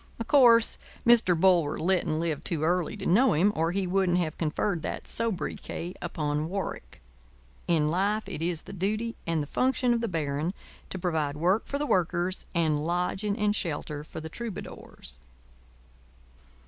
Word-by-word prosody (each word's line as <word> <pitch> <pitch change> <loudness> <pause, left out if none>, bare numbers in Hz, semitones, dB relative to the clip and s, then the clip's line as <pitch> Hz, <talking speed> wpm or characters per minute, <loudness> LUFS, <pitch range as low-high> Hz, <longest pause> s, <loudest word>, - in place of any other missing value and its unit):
Of 230 - -4
course, 235 -5 +5 0.3
Mr. 225 -8 +5
Bulwer 175 -5 +4
Lytton 170 -3 +1
lived 160 -3 -2
too 160 -3 -2
early 175 +4 0
to 195 - -6
know 235 +7 +4
him, 195 +7 +3
or 165 +1 +1
he 190 +1 -1
wouldn't 180 -1 +2
have 165 -3 -1
conferred 165 +3 -1
that - - -5
sobriquet 190 -5 -3
upon 150 -2 -2
Warwick. 190 - -5 0.6
In 155 -3 +2
life 200 +4 0
it 190 -5 -5
is 170 -1 -1
the - - -10
duty 215 +5 -1
and 165 -2 +1
the - - -5
function 255 - +1
of 235 - 0
the 230 - 0
Baron 155 +1 -2 0.3
to - - -4
provide 160 -5 -1
work 180 +7 +1
for 280 - -2
the 295 - -1
Workers 180 - 0
and 155 -3 +2
lodging 180 +5 -1
and 210 -1 +1
shelter 150 -5 -3
for 155 - -8
the 160 - -6
Troubadours. 190 - -7
180 Hz, 160 wpm, -28 LUFS, 160-205 Hz, 0.6 s, course